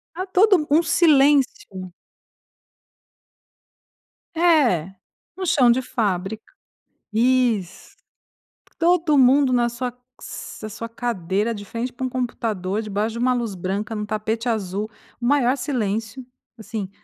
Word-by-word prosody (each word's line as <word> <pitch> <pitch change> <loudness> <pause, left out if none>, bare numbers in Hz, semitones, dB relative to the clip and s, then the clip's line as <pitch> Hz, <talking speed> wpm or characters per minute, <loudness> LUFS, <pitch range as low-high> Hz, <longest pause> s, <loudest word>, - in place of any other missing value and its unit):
era 370 +2 -3
todo 380 -3 +4
um 315 - +5
silêncio. 275 - +2 2.5
É, 270 - +3 0.4
no 375 -1 -4
chão 255 -7 +4
de 240 +2 +3
fábrica. 215 -4 -2 0.7
Isso. 235 -5 0 0.8
Todo 330 -3 +3
mundo 265 0 +5
na 240 -1 +2
sua 245 +1 -4 0.7
na 215 - -4
sua 230 +2 -7
cadeira 220 -2 -2
de 205 - -7
frente 235 +5 -5
para 260 - -6
um 255 - -1
computador 220 -6 -2
debaixo 215 +1 -2
de 235 - -5
uma 250 +1 +2
luz 235 -4 -2
branca 195 +4 -3
num 210 - -3
tapete 220 +3 -2
azul, 205 -1 -2 0.3
o - - -2
maior 260 -1 +3
silêncio, 230 -2 -3 0.3
assim 220 -3 -5
235 Hz, 120 wpm, -22 LUFS, 210-260 Hz, 2.5 s, um